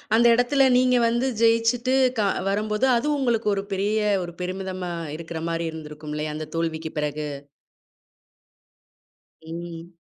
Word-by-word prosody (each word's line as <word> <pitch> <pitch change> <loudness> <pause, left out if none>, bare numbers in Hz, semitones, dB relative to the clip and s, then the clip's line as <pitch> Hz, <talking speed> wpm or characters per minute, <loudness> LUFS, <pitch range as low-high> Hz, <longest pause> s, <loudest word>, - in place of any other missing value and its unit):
அந்த 235 - +4
இடத்தில 265 +3 +3
நீங்க 250 0 +4
வந்து 240 +3 +1
ஜெய்ச்சிட்டு 230 +3 +3 0.2
கா 205 - +3 0.2
வரும்போது 210 +5 0
அது 275 +6 -1
உங்களுக்கு 235 -5 +1
ஒரு 195 - -2
பெரிய 205 +3 0 0.2
ஒரு 175 - -7
பெருமிதமா 185 0 -4 0.3
இருக்குற 165 -1 -6
மாரி 165 0 -1
இருந்திருக்கும் 150 -1 -8
இல்லையா, 150 0 -3
அந்த 155 - -5
தோல்விக்கு 160 -1 -2
பிறகு? 150 0 -2 2.1
ம். 170 +1 -8
190 Hz, 125 wpm, -24 LUFS, 165-230 Hz, 2.1 s, அந்த